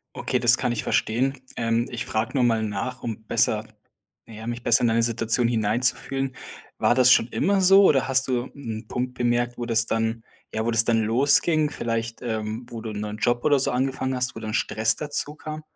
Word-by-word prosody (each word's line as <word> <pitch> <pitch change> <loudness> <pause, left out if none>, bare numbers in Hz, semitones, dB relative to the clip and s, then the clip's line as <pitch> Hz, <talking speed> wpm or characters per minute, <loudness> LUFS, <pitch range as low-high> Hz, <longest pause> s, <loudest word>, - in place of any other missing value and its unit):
Okay, - - -2
das - - +4
kann 120 - -1
ich 120 - -3
verstehen. 130 +5 -1 0.2
Ähm, 115 0 0
ich 120 -1 -5
frag 110 +4 -3
nur 130 - +1
mal 115 -2 +2
nach, 110 +5 -5
um 110 -2 -5
besser - - +2 0.6
na 115 - -13
ja, 110 +1 -9
mich 120 0 -5
besser 120 - +4
in 120 - +3
deine 115 +1 +1
Situation 115 +1 +1
hineinzufühlen. 125 +4 -1 0.4
War - - +2
das 130 0 +6
schon 115 - +3
immer 195 +10 0
so 195 +2 +6
oder 135 -7 +3
hast 130 0 +3
du 125 -2 -1
'n 115 -5 -7
Punkt 125 0 -4
bemerkt, 120 0 -1
wo 120 - -4
das 115 -1 +2
dann 115 0 -2 0.3
ja, 110 - -2
wo - - +1
das 115 0 +6
dann 115 -1 +1
losging. 145 +6 +3
Vielleicht 115 -3 -4
ähm, 110 0 -4
wo 115 -2 -8
du 110 0 -6
'n 105 - -6
neuen 105 0 -6
Job 120 +2 0
oder 145 -3 +3
so - - +4
angefangen 130 +1 -2
hast, 125 0 0
wo 110 - -8
dann 110 -1 -6
Stress 110 -1 +1
dazukam? 155 +1 -3
120 Hz, 210 wpm, -23 LUFS, 115-130 Hz, 0.6 s, das